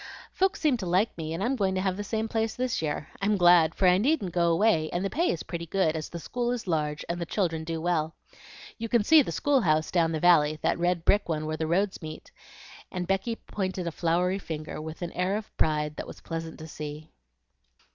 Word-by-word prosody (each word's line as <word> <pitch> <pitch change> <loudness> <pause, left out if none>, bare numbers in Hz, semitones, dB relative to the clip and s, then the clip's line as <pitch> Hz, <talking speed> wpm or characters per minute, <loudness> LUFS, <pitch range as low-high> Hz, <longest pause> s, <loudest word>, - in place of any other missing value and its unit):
Folks 385 +2 +1
seemed 290 -7 +2
to 185 - -4
like 185 +6 +2
me, 160 -1 -5
and 165 +4 -2
I'm 255 +4 +1
going 195 -5 0
to 185 - 0
have 190 -1 0
the 205 - -4
same 220 +2 -2
place 225 0 -1
this 250 -5 -1
year. 150 -1 -3
I'm 205 +2 +2
so - - +1
glad, 175 -3 +5
for 190 - +3
I 180 +1 +5
needn't 250 - +1
go 170 -1 +3
away 165 -3 +3
and 175 +3 -1
the 195 - -2
pay 340 +4 +1
is 165 - -2
pretty 170 -1 -6
good, 165 -2 +1
as 155 -1 -4
the 170 - -6
school 240 +8 -3
is 245 -2 -3
large 150 -4 -1
and 175 0 -3
the - - -1
children 165 -6 -1
do 165 0 -3
well. 165 -1 0 0.6
You 230 0 -4
can 235 -2 +3
see 315 +8 +7
the - - -3
school 285 -2 +2
house 155 -4 +1
down 165 -2 +2
the 160 - -1
valley, 155 -3 +4
that - - +1
red 175 -1 0
brick 205 -3 +3
one 155 -1 -1
where 155 0 -3
the 160 0 -2
roads 190 +4 0
meet;" 155 -1 -9 0.6
and 180 -1 -3
Becky 195 +5 -1
pointed 190 -4 -4
a 170 - -2
floury 180 +4 0
finger, 155 -3 -6
with 160 +3 -7
an 170 - -4
air 185 +3 0
of 215 - -9
pride 150 -1 0
that - - -5
was - - -10
pleasant 165 -1 -5
to 160 - -9
see. 150 0 -8
175 Hz, 240 wpm, -27 LUFS, 160-205 Hz, 0.6 s, see